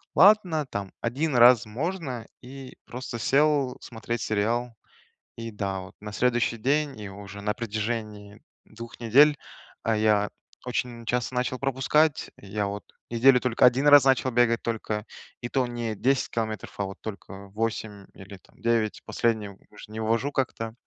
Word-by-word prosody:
"Ладно, 185 -6 +5
там 100 -4 -5
1 135 +4 -1
раз 120 -1 +7
можно", 130 - -4
и 130 +1 -11
просто 125 -1 -6
сел 140 0 +2
смотреть 115 0 -5
сериал. 115 +3 -1 0.6
И 115 0 -6
да, 100 -2 -3
вот 95 0 -12
на 105 0 -7
следующий 120 -1 +1
день 140 +1 0
и 105 -2 -7
уже 100 +1 -10
на 105 0 -1
протяжении 110 -1 -4 0.2
2 115 +2 -11
недель, 140 +6 +5 0.5
а, 115 -1 +1
я 105 -1 +2 0.4
очень 120 -1 -3
часто 125 +1 -1
начал 125 0 -1
пропускать. 140 +3 +1
Я, 100 +1 -3
вот, 100 0 -5 0.3
неделю 125 +2 +5
только 125 -2 0
1 130 +3 +4
раз 145 -2 +9
начал 130 -1 +3
бегать 115 -1 +2
только, 110 -2 -3 0.4
и 120 - -4
то 130 -2 0
не 120 -2 -3
10 130 +4 +1
километров, 110 -3 -4
а 100 - 0
вот 95 0 -8
только 100 -1 -8
8 105 -1 -4
или 95 0 -11
там - - -26
9, 115 -2 0
последние 110 -3 -1
вот 95 - -18
уж 105 - -12
не 110 +1 -7
вывожу 115 +6 0
как-то. 115 -4 -2
115 Hz, 160 wpm, -26 LUFS, 105-130 Hz, 0.6 s, раз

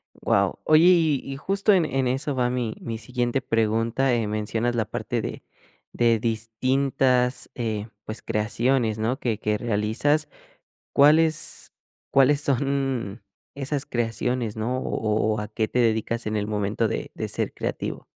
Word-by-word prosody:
Wao, - - +1
oye 155 +1 +5
y 165 -6 +4
y 135 0 -6
justo 195 +6 +2
en 175 -4 +4
en 135 -3 0
eso 135 +2 -1
va 125 -1 +1
mi 125 -3 -2
mi 115 -1 -4
siguiente 125 +2 -1
pregunta, 115 +3 +1
eh, 115 -3 0
mencionas 110 +3 -1
la 110 -3 +1
parte - - -3
de - - -6 0.5
de 115 -2 +3
distintas, 125 +3 +1
eh, 110 -3 -3 0.2
pues, 110 - -6
creaciones, 110 +1 0
¿no?, 120 +5 -1
que 115 -6 -1
que 105 0 0
realizas, 120 +8 0 0.7
¿cuáles 155 +2 +3 0.4
cuáles 140 +2 +4
son 135 -6 -1 0.3
esas 140 0 -2
creaciones, 120 -1 -2
¿no?, 115 +4 -2
o - - -6 0.2
o 110 0 +1
o - - -3
a 105 - -4
qué 110 0 -1
te 125 - -1
dedicas 115 0 +1
en 110 0 -2
el 105 0 -1
momento 105 +2 0
de - - -4
de - - -4
ser - - -2
creativo? - - -4
120 Hz, 155 wpm, -24 LUFS, 110-135 Hz, 0.7 s, oye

